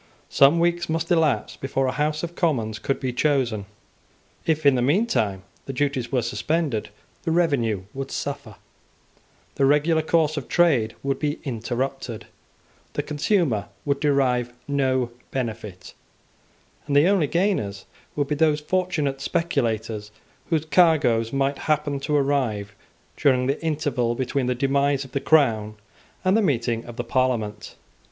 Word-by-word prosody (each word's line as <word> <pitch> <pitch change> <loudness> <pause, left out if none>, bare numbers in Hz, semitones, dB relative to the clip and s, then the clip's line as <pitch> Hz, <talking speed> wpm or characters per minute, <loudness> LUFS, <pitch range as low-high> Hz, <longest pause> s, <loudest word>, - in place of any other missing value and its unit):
Some 140 +5 +5
weeks 175 0 +1
must 165 +1 -1
elapse 160 -4 +2
before 135 0 -1
a 130 - +1
House 150 +2 -1
of 170 0 -4
Commons 120 - 0
could 135 - -1
be 130 -2 -2
chosen. 125 -7 0 0.8
If, 155 -2 +1
in 140 - +7
the 125 - +1
meantime, 125 - +1 0.2
the 135 - -4
duties 135 -2 -1
were 125 -3 +1
suspended, 135 0 -1 0.3
the 165 - -3
revenue 140 - +1
would 135 0 -5
suffer; - - -5 1.0
the 135 - +3
regular 155 +3 +3
course 155 -1 +1
of 140 - -4
trade 140 -11 +2
would 135 0 -1
be 150 0 -1
interrupted; 125 -1 -3 0.7
the - - -2
consumer 150 - 0 0.2
would 140 -1 0
derive 130 -4 +1 0.2
no 130 -3 +1 0.2
benefit, 110 -7 -5 0.9
and 140 - 0
the 145 +4 +6
only 190 -6 +3
gainers 155 - -1 0.3
would 145 -1 0
be 150 - -1
those 150 0 +2
fortunate 150 -4 -1
speculators 115 -10 -1 0.4
whose 160 -2 +1
cargoes 145 -8 +3
might 135 0 0
happen 145 -2 +1
to 150 +2 -1
arrive 130 -8 0 0.4
during 130 -2 +2
the 140 +3 -1
interval 145 -7 0
between 130 +1 -1
the 125 - 0
demise 140 +1 +1
of 130 - -14
the 140 - -1
crown 110 -9 +3 0.5
and 185 +2 +4
the 225 - +4
meeting 120 - 0
of 120 - -9
the 120 - -3
Parliament. 115 -4 -1
140 Hz, 145 wpm, -24 LUFS, 120-155 Hz, 1.0 s, in